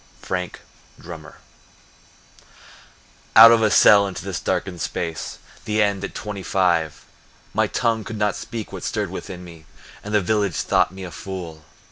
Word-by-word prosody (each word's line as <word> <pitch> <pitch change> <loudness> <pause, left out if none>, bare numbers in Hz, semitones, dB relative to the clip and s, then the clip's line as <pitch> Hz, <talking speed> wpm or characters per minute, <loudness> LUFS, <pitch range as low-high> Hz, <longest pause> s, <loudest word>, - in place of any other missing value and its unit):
Frank 90 -1 -4 0.4
Drummer 80 -2 -10 2.0
Out 115 +1 +11
of 115 -1 +4
a 110 - +3
cell 100 0 +6
into 95 0 -7
this 95 -2 -3
darkened 90 -1 -2
space— 80 -3 -4 0.3
The 105 0 -1
end 100 -2 +1
at 100 - -6
twenty 105 -2 -5
five! 85 -5 0 0.5
My - - +2
tongue 115 -3 0
could 110 +2 -7
not 105 -1 0
speak 115 -3 -7
what - - -6
stirred - - -2
within 90 -1 -7
me, 85 -3 -13 0.4
And 105 - -7
the - - +5
village 100 -3 0
thought - - +2
me 95 0 -9
a 90 - -7
fool. 85 -5 -8
95 Hz, 155 wpm, -22 LUFS, 85-105 Hz, 2.0 s, Out